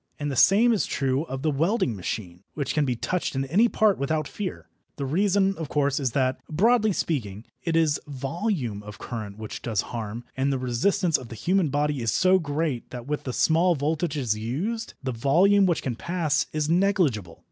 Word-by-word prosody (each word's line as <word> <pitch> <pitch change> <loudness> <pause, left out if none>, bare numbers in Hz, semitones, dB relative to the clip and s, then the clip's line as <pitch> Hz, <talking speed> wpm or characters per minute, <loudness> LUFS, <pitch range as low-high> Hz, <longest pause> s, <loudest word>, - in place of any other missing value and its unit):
And 145 -1 -3
the - - -3
same 220 - +5
is 215 - 0
true 135 +2 0
of 135 -3 -6
the 155 - +2
welding 160 - +1
machine, 90 -1 -5
which 140 -2 -2
can 150 -1 +2
be 125 -2 0
touched 180 +6 -2
in 135 0 0
any 195 - +4
part 215 -3 +2
without 155 +2 -1
fear. 200 -3 -6 0.3
The 140 - -4
reason, 195 +6 +2
of 160 - -4
course, 140 -1 +1
is 130 -5 -1
that, 130 -1 +1
broadly 215 +6 +3
speaking, 115 - -2 0.2
it 165 -2 -1
is 160 -3 +2
volume 140 - -3
of 105 0 -10
current 110 -4 -6
which 110 -1 -7
does 110 -4 0
harm, 115 0 -4
and 135 +1 +1
the 135 - 0
resistance 130 +7 +1
of 130 - -10
the 115 - -7
human 180 - +1
body 145 -1 0
is 115 -2 0
so 185 +1 +4
great 145 -5 -2
that 120 -2 -7
with 150 +1 -3
the 130 - -2
small 170 +5 +3
voltages 145 -4 -1
used, 160 - -3
the 130 - -1
volume 180 - +4
which 175 - 0
can 125 -3 -2
pass 155 0 0
is 155 -1 -1
negligible. 165 - +1
145 Hz, 195 wpm, -25 LUFS, 125-180 Hz, 0.3 s, same